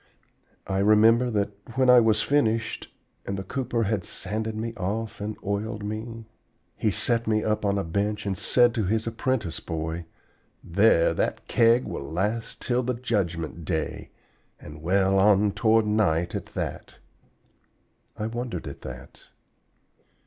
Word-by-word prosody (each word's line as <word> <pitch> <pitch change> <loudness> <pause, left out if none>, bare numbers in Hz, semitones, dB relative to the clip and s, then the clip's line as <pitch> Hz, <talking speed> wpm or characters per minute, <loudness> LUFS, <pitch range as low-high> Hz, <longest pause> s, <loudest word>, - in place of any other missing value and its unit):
I 95 0 -1
remember 110 +4 +5
that 105 -2 0 0.2
when 130 -1 +3
I 125 0 +8
was 110 -2 +3
finished 115 -6 0 0.4
and 100 - -2
the 95 - -4
cooper 120 +2 -2
had 105 -2 -1
sanded 110 +5 -3
me 115 +1 -3
off 110 +1 -4
and 105 +1 -4
oiled 105 +1 -2
me, 110 +2 -5 0.5
he 110 - 0
set 115 +3 +1
me 110 -1 +2
up 105 -1 0
on 100 -1 +1
a 100 - 0
bench 100 +5 -2
and 100 -1 -1
said 120 +4 +3
to 110 -3 -1
his 110 +4 0
apprentice 115 -5 -2
boy: 80 +1 -4 0.6
'There, 95 -1 +4
that - - -2
Keg 115 +1 +4
will - - -5
last 95 +11 -3
till 125 0 +1
the 125 0 -2
Judgment 85 -9 -2
Day, 80 -1 -3 0.5
and 75 0 -11
well 95 +3 +2
on 100 +1 +4
toward 110 +2 +3
night 95 -6 +1
at - - -4
that.' - - -5 1.2
I 105 - -3
wondered 115 -5 -4
at 70 - -8
that. 65 -1 -10
105 Hz, 150 wpm, -26 LUFS, 95-115 Hz, 1.2 s, I